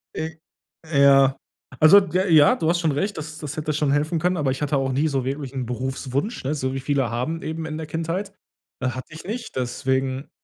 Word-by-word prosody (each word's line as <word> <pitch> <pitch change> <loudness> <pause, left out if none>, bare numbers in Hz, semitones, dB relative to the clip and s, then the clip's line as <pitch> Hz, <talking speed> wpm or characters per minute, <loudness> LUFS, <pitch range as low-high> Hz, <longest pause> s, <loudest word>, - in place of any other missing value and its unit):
I 160 0 -4 0.5
ja. 135 -2 +5 0.4
Also, 155 +6 +9
d 190 -5 -6
ja, 190 - +1
ja, 155 -4 +6
du 160 - 0
hast 170 +1 +2
schon 165 -3 +1
recht, 195 +9 -2
das 155 0 -7
das 150 -1 -6
hätte 155 0 -2
schon 150 -1 +1
helfen 150 +3 +1
können, 180 +3 +1
aber 145 -4 +1
ich 130 - -4
hatte 145 -1 +1
auch 135 0 0
nie 140 +4 +1
so 135 -4 -1
wirklich 135 0 -4
'n 130 -2 -3
Berufswunsch, 130 - -3
ne? 135 +3 -1
So 130 -3 -2
wie 135 - -2
viele 135 -2 0
haben 125 +8 -3
eben 160 +1 -4
in 155 -1 -5
der 160 -1 -6
Kindheit. 165 +6 -3 0.5
Hatte 130 +3 -4
ich 155 - -9
nicht, 230 +6 -6
deswegen 130 +1 -1
145 Hz, 220 wpm, -23 LUFS, 135-160 Hz, 0.5 s, Also